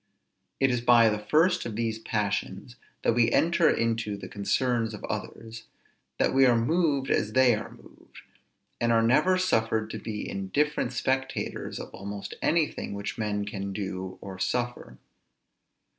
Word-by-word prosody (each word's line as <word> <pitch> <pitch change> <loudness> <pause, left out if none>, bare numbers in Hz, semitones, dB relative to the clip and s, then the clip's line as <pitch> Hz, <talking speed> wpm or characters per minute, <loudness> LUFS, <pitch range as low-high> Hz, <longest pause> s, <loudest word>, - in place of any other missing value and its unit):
It 135 -1 +3
is 125 -1 0
by 120 -1 +6
the 105 0 -1
first 160 - +2
of 115 -3 -5
these 110 -1 -2
passions 105 -3 -3 0.3
that - - +3
we 115 0 +3
enter 170 +6 +3
into 115 -3 0
the - - -8
concerns 115 +2 0
of - - -12
others; 115 0 -6 0.5
that - - +1
we 135 0 +6
are 120 -2 +4
moved 140 +1 +1
as 105 +1 +1
they 130 -1 +5
are - - -4
moved, - - -17 0.6
and 120 0 +1
are 115 0 +4
never 180 +11 +4
suffered 110 -10 0
to - - -5
be 105 -2 -5
indifferent 120 +8 -1
spectators 130 +1 -2
of - - -9
almost 100 +1 -6
anything 155 -10 0
which 100 +3 -5
men 105 -1 -1
can 100 -2 -5
do 95 -2 -5
or 95 -1 -8
suffer. 120 - -2
115 Hz, 155 wpm, -27 LUFS, 105-130 Hz, 0.6 s, by